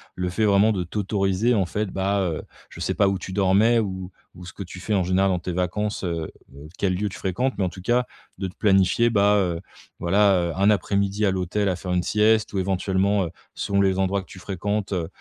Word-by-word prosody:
le 90 0 -2
fait 110 +5 -1
vraiment 105 +2 +4
de 95 -3 -1
t'autoriser 100 +4 0
en 100 -5 +2
fait, 105 +5 -2
bah, 100 +1 0
heu, 85 -4 -2 0.3
je - - -12
sais - - 0
pas 100 - +3
où 95 - -1
tu 95 - -7
dormais 100 +4 +4
ou 95 -3 -4 0.2
ou 90 +1 -11
ce 90 - -10
que - - -10
tu 90 0 -10
fais 105 - -2
en 95 -3 +2
général 95 +2 +2
dans 90 - 0
tes 90 +1 -4
vacances, 100 +4 -2
heu 85 -3 -3 0.2
heu, 70 +2 -11
quel 95 -2 +1
lieu 105 +3 -1
tu - - -9
fréquentes, 125 +8 -1
mais 100 - 0
en 90 - 0
tout 90 - -11
cas 120 +6 +1 0.3
de 95 - -3
te - - -16
planifier, 95 +3 +3
bah, 105 -2 +3
heu, 85 -4 0 0.4
voilà, 100 +3 +3 0.2
heu, - - -6
1 100 +2 +4
après-midi 100 +1 +1
à 95 - +3
l'hôtel 95 +2 -1
à 90 - -1
faire 90 0 -4
une 90 -1 +1
sieste 110 +2 +2
ou 100 - 0
éventuellement, 95 +1 +1
heu, - - -5 0.3
selon 100 0 -1
les 95 -1 +2
endroits 95 +1 +1
que 95 - -17
tu 95 - -12
fréquentes, 100 +3 -3
heu, 85 -3 -1
95 Hz, 240 wpm, -24 LUFS, 90-105 Hz, 0.4 s, vraiment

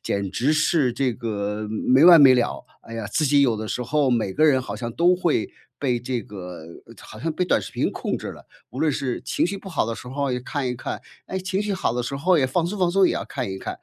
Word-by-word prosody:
简 100 -1 -2
直 130 +9 +1
是 155 -4 +2
这 130 0 0
个 105 -1 -3
没 130 +7 +3
完 170 -3 +9
没 135 -2 +8
了。 125 -1 -1 0.2
哎 115 - -10
呀， 110 -2 -4
自 155 - +1
己 145 0 +4
有 120 -5 +3
的 110 - -5
时 125 - -3
候 135 +2 +1
每 110 -5 0
个 155 - +3
人 135 -4 +4
好 105 -5 -6
像 115 +1 -5
都 175 +5 +3
会 170 -10 0 0.3
被 125 -4 0
这 120 -1 -3
个 90 -5 -9 0.4
好 110 - -12
像 165 +3 -1
被 180 +3 -1
短 - - +2
视 - - -9
频 - - 0
控 - - -3
制 - - -7
了。 - - -10 0.2
无 130 - -8
论 155 - +2
是 130 -2 -3
情 - - 0
绪 200 +2 -4
不 195 - -10
好 180 - 0
的 115 +1 -3
时 125 - -11
候 140 +2 -2
也 125 - -1
看 135 +2 -3
一 125 - -2
看， - - -5 0.3
哎， 190 - -5
情 190 +1 -2
绪 210 -1 -1
好 190 - -1
的 125 - -1
时 125 +3 -4
候 165 +5 +2
也 130 - +3
放 160 +6 0
松 195 +5 -3
放 180 -2 +2
松， 190 0 +4
也 - - +1
要 - - -3
看 130 -7 -4
一 95 - -5
看， - - -6
130 Hz, 290 characters per minute, -23 LUFS, 115-160 Hz, 0.4 s, 完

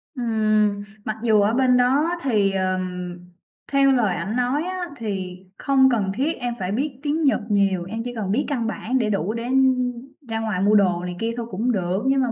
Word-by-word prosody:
Ừm, 215 -4 +1 0.2
mặc 215 0 -3
dù 215 -3 +4
ở 210 +3 +2
bên 250 0 +3
đó 270 +6 +3
thì, 210 -7 +2
ờm, 185 -2 -2 0.5
theo 275 0 +4
lời 225 -8 +2
ảnh 195 +6 -3
nói 250 +5 0
á 365 0 -3
thì 190 -5 -4 0.2
không 265 -1 +4
cần 200 -5 0
thiết 290 +6 0
em 245 -1 -2
phải 185 +1 -2
biết 265 +3 -2
tiếng 305 +2 0
Nhật 275 - +3
nhiều, 195 -3 +2
em 225 +4 -5
chỉ 245 - -5
cần 200 -3 -2
biết 270 +7 +1
căn 240 -6 -1
bản 240 +3 -2
để 225 -4 0
đủ 200 +1 -1
để 230 0 -4 0.9
ra 225 0 -2
ngoài 215 -4 -2
mua 210 +2 +4
đồ 180 -4 +3
này 180 0 -5
kia 230 +1 -1
thôi 235 - -3
cũng 230 +7 0
được, 190 0 -1
nhưng 270 0 +3
mà 245 -2 0
225 Hz, 210 wpm, -23 LUFS, 195-255 Hz, 0.9 s, dù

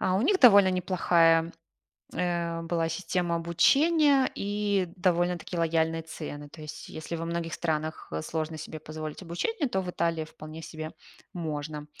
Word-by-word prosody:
А 185 0 +2
у 200 - +1
них 375 +8 +3
довольно 200 -6 +8
неплохая, 170 -2 +3 0.6
э, 170 -2 -1
была 165 -1 0
система 175 0 -1
обучения 275 - +4
и 205 -2 0
довольно-таки 175 -1 0
лояльные 165 0 +1
цены. 145 -2 -7
То 155 - -12
есть, 150 - -8
если 160 +2 -5
во 165 - -4
многих 170 0 -3
странах 155 - -3
сложно 160 - -3
себе 155 0 -7
позволить 155 +1 -7
обучение, 275 - -2
то 190 -6 0
в 180 -1 -4
Италии 165 -2 0
вполне 155 +1 -10
себе 155 0 -7 0.4
можно. 150 -2 -4
170 Hz, 145 wpm, -28 LUFS, 160-185 Hz, 0.6 s, довольно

